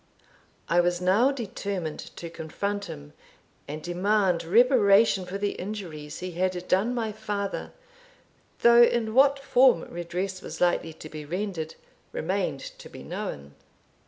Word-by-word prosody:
I 170 +2 +3
was 175 0 +2
now 200 +9 +4
determined 200 - -4
to 170 - -8
confront 200 +6 -3
him, 70 - -9 0.5
and 150 +2 -6
demand 185 0 +1
reparation 205 -1 +4
for 190 +2 -4
the 205 0 -1
injuries 170 -7 -7
he 185 0 -4
had 180 +1 -2
done 215 +7 +2
my 225 -3 -1
father, 205 -2 -4 0.9
though 235 0 +7
in 235 -2 +3
what 275 +2 +5
form 255 -7 +4
redress 180 +3 -4
was - - -8
likely 175 -2 +1
to 155 - -10
be 155 -1 -8
rendered 175 0 -4 0.4
remained - - -1 0.2
to - - -11
be - - -11
known. 70 0 -6
190 Hz, 135 wpm, -27 LUFS, 170-215 Hz, 0.9 s, though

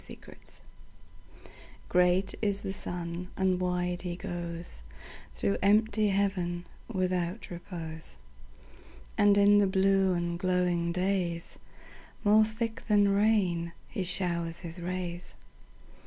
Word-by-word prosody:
Summer - - -8 0.3
Sun - - -9 1.3
GREAT 180 +2 +3
is 205 -2 0
the 190 - -3
sun, 175 -1 -4
and 185 -1 +2
wide 180 0 -1
he 175 -1 -4
goesThrough 170 - -4
empty 215 +1 +3
heaven 190 -3 0 0.3
without 185 0 -1
repose; 165 -2 -6 1.0
And 205 -1 +5
in 205 0 +6
the 200 - +4
blue 190 0 +3
and 170 0 -2
glowing 180 -2 +1
daysMore 190 +3 -1
thick 225 +1 -3
than 205 -2 +4
rain 195 -5 +2
he 200 -5 -3
showers 170 -2 -1
his 170 0 -7
rays. 180 0 -4
180 Hz, 105 wpm, -30 LUFS, 175-200 Hz, 1.3 s, in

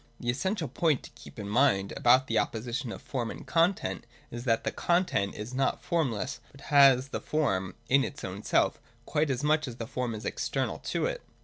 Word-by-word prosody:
The 120 - 0
essential 180 - -2
point 150 +2 +1
to - - -11
keep - - -14
in 105 -2 -5
mind 105 -3 +2
about 125 +2 +5
the 115 - -4
oppo 110 - 0
sition 120 +1 -3
of - - -8
Form 120 -4 -3
and - - -8
Content 165 - +1 0.2
is 120 +1 -6
that 115 -2 +2
the - - -1
content 170 - +1
is 105 +4 -6
not 135 +1 0
formless, 130 -7 -1
but 140 - -16
has 135 -2 +5
the - - -4
form 95 -12 -1
in 135 +1 +4
its 145 - -6
own 95 +2 -5
self, - - +2 0.3
quite 155 -1 0
as 130 0 -1
much 155 0 +2
as 120 - -6
the 115 - -5
form 125 -1 -3
is 105 - -8
external - - -2
to - - 0
it. - - -2
130 Hz, 210 wpm, -29 LUFS, 115-145 Hz, 0.3 s, about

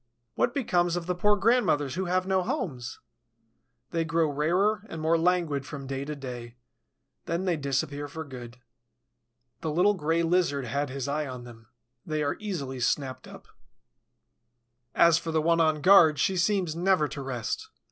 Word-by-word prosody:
What 240 - 0
becomes 175 -10 +1
of 175 -1 -3
the 180 - 0
poor 210 +4 +3
grandmothers 195 - +2
who 190 +1 -2
have 185 +1 0
no 190 0 +1
homes? 130 -9 -4 0.9
They 165 -1 0
grow 165 -1 +1
rarer 185 +9 +1
and 165 - -6
more 160 +1 +2
languid 165 -4 +1
from 140 -1 -8
day 135 +1 -4
to 150 +1 -5
day; 125 -3 -8 0.7
then 170 +3 -1
they 180 -2 +1
disappear 145 0 -2
for 160 +3 -6
good. 125 -4 -10 1.0
The 160 - -3
little 180 +7 +3
Gray 165 -2 0
Lizard 165 -6 +1
had 140 +4 -2
his 135 0 -4
eye 150 +1 -1
on 125 -2 -7
them, 115 -2 -13 0.4
they 155 -1 -2
are 145 - -1
easily 150 -12 -4
snapped 130 +1 -1
up. - - -13 1.5
As 170 -1 +5
for 165 - -5
the 160 - +2
one 165 +1 +3
on 155 -2 +2
guard, 165 -3 +7
she 190 - +1
seems 180 -2 +1
never 180 -3 +2
to 140 - -6
rest. 125 -4 -4
160 Hz, 165 wpm, -27 LUFS, 140-180 Hz, 1.5 s, guard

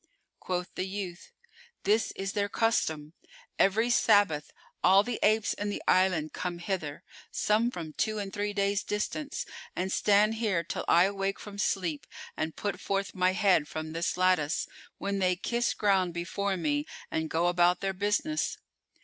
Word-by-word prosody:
Quoth 180 -1 -3
the 185 - -3
youth, 190 -3 -6 0.5
"This 215 +3 +2
is 195 0 -4
their 205 -1 0
custom. 160 -10 0 0.5
Every 220 +5 +3
Sabbath,[FN#413] 205 -11 +3 0.3
all 190 +2 +6
the 240 +1 -3
apes 215 0 +3
in 205 0 -3
the 205 - -4
island 185 -4 +3
come 180 -1 -3
hither, 170 -5 -4 0.3
some 220 +3 +2
from 165 -9 -7
two 215 +6 -1
and 200 -2 -4
three 205 0 -1
days' 200 -1 +1
distance, 275 +8 -3 0.3
and 185 +1 -2
stand 210 +2 +4
here 190 -7 +1
till - - -4
I 170 - +6
awake 195 0 -1
from 200 -1 -9
sleep 180 -6 -1 0.3
and 160 0 -3
put 200 -3 -3
forth 195 0 -2
my 185 0 +2
head 190 -7 +3
from 155 0 -5
this 165 +2 -1
lattice, 180 -4 +2 0.3
when 200 0 -2
they 185 -1 +2
kiss 235 +6 -1
ground 190 -4 +2
before 190 +3 -2
me 290 - -1 0.2
and 160 0 -1
go 165 +2 +1
about 175 0 +3
their 195 0 -1
business." 210 +11 0
195 Hz, 160 wpm, -29 LUFS, 175-205 Hz, 0.5 s, all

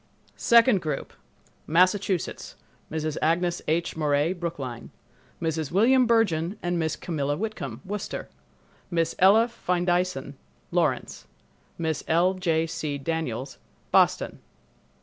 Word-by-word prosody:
Second 235 -4 +5
Group 150 -4 -4 0.5
Massachusetts—Mrs. 170 -3 -1
Agnes 170 +2 +1
H. 165 +2 0
Morey, 150 +1 +1
Brookline; 145 -9 -5 0.5
Mrs. 160 -3 -2
William 240 +7 +4
Bergen 205 -6 +2
and 175 0 0
Miss 160 -2 0
Camilla 145 -4 -2
Whitcomb, 155 - -5
Worcester; 205 +1 -5 0.6
Miss 165 -2 0
Ella 210 +5 +6
Findeisen, 180 - -1 0.4
Lawrence; - - -1 0.5
Miss 160 -2 -2
L. 175 +3 +3
J. 165 -3 0
C. 155 -3 -3
Daniels, 135 -4 -3 0.3
Boston. - - +3
170 Hz, 100 wpm, -26 LUFS, 155-185 Hz, 0.6 s, Ella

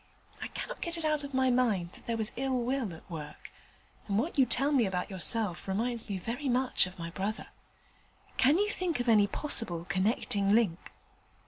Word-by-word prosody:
I - - -3
cannot - - -7
get 340 0 -1
it 325 - -2
out 305 -1 +1
of 280 - -7
my 260 -1 +2
mind 215 -9 +1
that - - -17
there 230 -1 -1
was 220 +1 +1
ill 265 0 -1
will 245 -3 -1
at 160 - -12
work, 155 -4 -9 0.6
and 200 -1 0
what 290 +10 -1
you 265 -4 +4
tell 280 +2 +2
me 255 -7 +3
about 185 +1 -3
yourself 190 +1 +2
reminds 230 +4 -2
me 200 - -2
very 245 - -4
much 250 -5 +2
of 185 +1 -11
my 170 -1 -6
brother. 200 +4 -4 0.9
Can 280 +5 +4
you 415 +2 +1
think 350 -9 -2
of 245 - -2
any 210 -3 +5
possible 195 - +1
connecting 200 +2 0
link?' 205 -7 +1
230 Hz, 195 wpm, -30 LUFS, 190-265 Hz, 0.9 s, any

